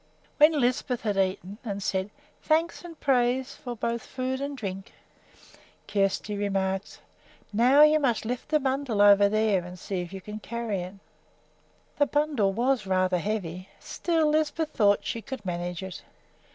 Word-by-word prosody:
When 300 0 +6
Lisbeth 250 0 0
had 210 -3 -1
eaten 190 +1 -1
and 215 -5 -3
had 200 0 -6
said 190 +1 -1 0.3
"Thanks 330 +3 +1
and 335 -3 -10
praise 255 -1 +1
for 250 -5 -7
both 235 +1 -2
food 260 +1 -3
and 280 0 -4
drink," 195 -4 -6 0.9
Kjersti 200 +1 0
remarked: 195 -1 -2 0.5
"Now 255 +7 +6
you 305 0 +6
must 245 -6 0
lift 245 +2 -4
the 305 - +3
bundle 265 -5 -1
over 205 0 +7
there 215 -3 +2
and 180 +1 -9
see 185 0 -4
if 175 0 -7
you 195 - -6
can 210 +3 -8
carry 230 -3 -3
it." 180 +2 -8 1.0
The 290 - +4
bundle 290 -9 +1
was 235 0 0
rather 185 -1 +2
heavy. 185 -2 -4
Still, 330 -2 0
Lisbeth 310 +1 +1
thought 205 -5 +3
she 230 - -3
could 260 -3 -7
manage 175 0 -3
it. 190 -1 -7
220 Hz, 160 wpm, -27 LUFS, 195-270 Hz, 1.0 s, over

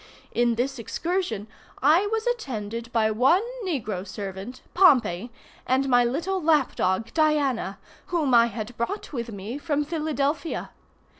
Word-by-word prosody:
In 240 -1 +2
this 260 +2 -1
excursion 280 - -2 0.3
I 325 +9 +4
was 445 +1 -1
attended 235 - -3
by 220 -2 +2
one 265 - +4 0.2
negro 220 - -2
servant, 195 +4 -7
Pompey, 250 - +4 0.4
and 265 +2 +2
my 245 -2 +5
little 335 +10 -1
lap 305 -4 +3
dog 190 +5 0
Diana, 285 - +1 0.3
whom 315 -7 0
I 235 0 +7
had 230 0 -6
brought 300 - -3
with 235 -3 -4
me 210 +7 -6
from 295 -1 0
Philadelphia. 305 -1 -2
260 Hz, 135 wpm, -25 LUFS, 230-315 Hz, 0.4 s, I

